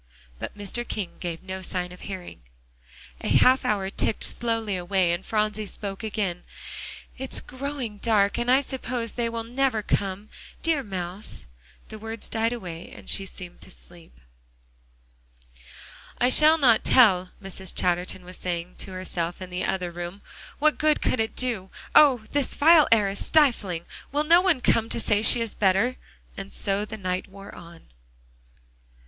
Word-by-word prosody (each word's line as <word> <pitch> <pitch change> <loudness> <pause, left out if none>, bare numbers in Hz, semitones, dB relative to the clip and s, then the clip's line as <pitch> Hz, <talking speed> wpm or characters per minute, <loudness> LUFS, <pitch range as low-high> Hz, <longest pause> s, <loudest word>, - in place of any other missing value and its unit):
But - - -6
Mr. 205 +4 -3
King 200 -5 -3
gave 170 -1 -5
no 190 0 -6
sign 180 -1 -2
of 180 - -12
hearing. 190 - -8 0.8
A - - -2
half 260 +1 +5
hour 195 -2 0
ticked 215 - 0
slowly 225 -4 0
away, 180 0 +1
and 175 +2 -2
Phronsie 215 -1 -1
spoke 195 +1 -5
again. 200 -5 -2 0.8
"It's 265 0 0
growing 260 -5 -5
dark, 210 -2 +2
and 240 +1 -1
I 260 +2 +6
suppose 250 -4 -3
they 235 -1 -2
will 230 0 -4
never 245 -2 0
come. 200 +1 -2 0.3
Dear 325 -4 +2
mouse" 190 -2 -5 0.4
the 215 - -8
words 225 +1 -7
died 225 +1 0
away 180 -8 -7
and - - -7
she 195 - -1
seemed 180 -2 -10
to - - -12
sleep. 170 - -11 2.0
"I 245 - +3
shall 305 +4 +6
not 245 -7 +4
tell," 185 -7 +5
Mrs. 190 -1 -5
Chatterton 180 0 0
was 180 +1 -7
saying 175 0 -4
to 190 - -5
herself 175 -2 -3
in 185 -1 -8
the 180 0 -2
other 180 -2 -2
room; 175 +3 -7 0.3
"what 305 +1 +2
good 305 -1 +2
could 255 - +1
it 220 0 -1
do? 230 -7 -2 0.2
Oh! 265 -7 +7
this 285 -2 -1
vile 315 +1 +6
air 215 -3 +5
is 195 - -2
stifling. 225 - +2 0.3
Will 295 +2 +1
no 335 +3 +6
one 365 -8 +2
come 225 -2 +2
to - - -1
say 210 -2 +2
she 230 +2 +7
is 230 -2 -2
better?" 200 +6 +2 0.4
And 195 0 -7
so 200 +1 -1
the 220 +1 -7
night 185 -2 -3
wore 195 0 -12
on. 170 -1 -13
205 Hz, 165 wpm, -25 LUFS, 185-240 Hz, 2.0 s, Oh